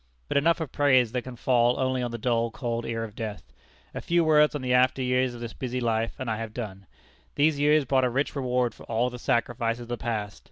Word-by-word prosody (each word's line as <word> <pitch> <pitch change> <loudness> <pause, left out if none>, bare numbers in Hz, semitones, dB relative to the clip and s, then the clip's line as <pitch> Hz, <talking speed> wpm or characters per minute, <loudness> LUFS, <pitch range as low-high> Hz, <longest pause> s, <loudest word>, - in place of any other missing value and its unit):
But - - 0
enough 165 +4 +3
of 160 -5 -4
praise 130 -5 +3
that 125 0 -1
can 130 0 -9
fall 120 0 +2
only 130 -1 0
on 120 - -2
the 115 - -5
dull, 115 0 0
cold 120 -1 -4
ear 115 -1 -2
of 110 -2 -7
death. 105 - -7 0.4
A - - -5
few 170 0 +2
words 150 -1 +4
on 145 - -4
the 125 0 0
after 125 +1 +3
years 125 0 +1
of 120 - -10
this 115 -1 -6
busy 125 -1 -4
life, 115 -1 -1
and 130 - -5
I 110 -1 -1
have 110 -1 -6
done. 100 -5 -6 0.5
These 150 0 +2
years 150 0 +4
brought 130 +1 +2
a - - +1
rich 135 +5 -1
reward 125 -3 0
for - - -18
all 120 +2 0
the 125 - -8
sacrifices 120 0 0
of 120 - -10
the 120 - -2
past. 105 -4 -4
125 Hz, 245 wpm, -26 LUFS, 115-130 Hz, 0.5 s, words